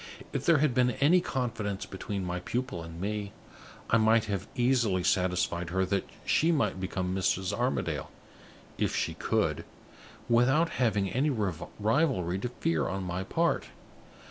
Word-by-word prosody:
"If - - -3
there 165 -2 +6
had 145 -3 +2
been 125 0 +3
any 170 +6 +5
confidence 115 - -3
between 95 0 -5
my 90 0 -2
pupil 125 0 -3
and 85 0 -9
me, 100 +1 -3 0.6
I 115 - +6
might 110 0 +4
have 100 -3 -3
easily 120 -7 +2
satisfied 90 -2 +1
her 95 +2 +1
that 100 +1 -1 0.2
she 165 +2 +3
might 115 - +1
become 95 0 -2
Mrs. 95 0 0
Armadale - - -1 0.7
if - - 0
she - - 0
could - - 0 0.6
without 135 +8 +4
having 105 -6 +1
any 135 +9 +1
rivalry 105 - 0
to 125 - -3
fear 80 - 0
on 95 0 -3
my 90 +1 -3
part. 165 - 0
105 Hz, 145 wpm, -29 LUFS, 95-125 Hz, 0.7 s, there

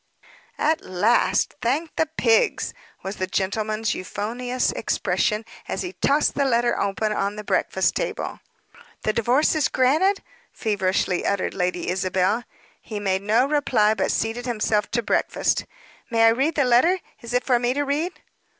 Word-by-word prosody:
"At 315 +2 +1
last, 205 +6 +2
thank 290 +8 -1
the 320 - +1
pigs!" 235 -8 +1 0.3
was 195 +2 -5
the 185 - -2
gentleman's 215 +3 -1
euphonious 245 +7 -2
expression, 215 0 -1 0.2
as - - -3
he 360 0 -5
tossed 290 +2 +2
the 280 - +1
letter, 240 -2 +2
open, 200 +2 -1
on 200 0 -1
the 210 - -6
breakfast - - +1
table. - - -3 0.6
"The 215 - +1
divorce 245 +7 +2
is 310 -3 +2
granted!" 315 +10 +2 0.3
feverishly 190 -4 0
uttered 200 -1 -1
Lady 180 -2 -2
Isabel. 190 +4 0 0.4
He 215 -2 -6
made 190 -2 0
no 220 +5 +3
reply, 265 -7 +2
but 195 - -1
seated 230 +3 -1
himself 215 -3 0
to 235 0 -1
breakfast. - - 0 0.4
"May 225 -1 +4
I - - +8
read 270 +8 +1
the 285 - +3
letter? 250 +10 +4 0.2
Is 235 +1 -5
it 250 - +2
for 250 -2 +2
me 245 +1 0
to 290 - +1
read?" 300 +6 -2
230 Hz, 155 wpm, -23 LUFS, 205-265 Hz, 0.6 s, I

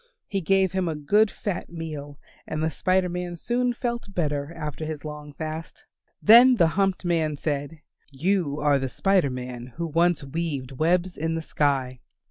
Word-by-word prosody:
He 195 -1 -2
gave 190 +1 +3
him 185 -1 -1
a 160 - -1
good 205 +9 +3
fat 195 -3 -4
meal 150 -4 -7 0.3
and 155 - -2
the 160 - +1
Spider 185 +3 +1
Man 180 0 -4
soon 245 +6 0
felt 235 -4 -4
better 145 -3 -1
after 150 -1 -5
his 155 -1 -5
long 150 -1 -7
fast. 155 +2 -7 0.4
Then 245 +4 +9
the 170 -7 +4
humped 195 +1 0
man 160 -4 +1
said, 145 +1 -3 0.3
"You 150 +1 0
are 145 -2 +3
the 135 -1 -2
Spider 190 -1 +2
Man 125 -1 -7
who 170 - -3
once 170 0 +2
weaved 140 -2 -3
webs 175 +6 +1
in 160 +1 -1
the 165 - -3
sky. 135 -5 0
160 Hz, 170 wpm, -25 LUFS, 145-185 Hz, 0.4 s, Then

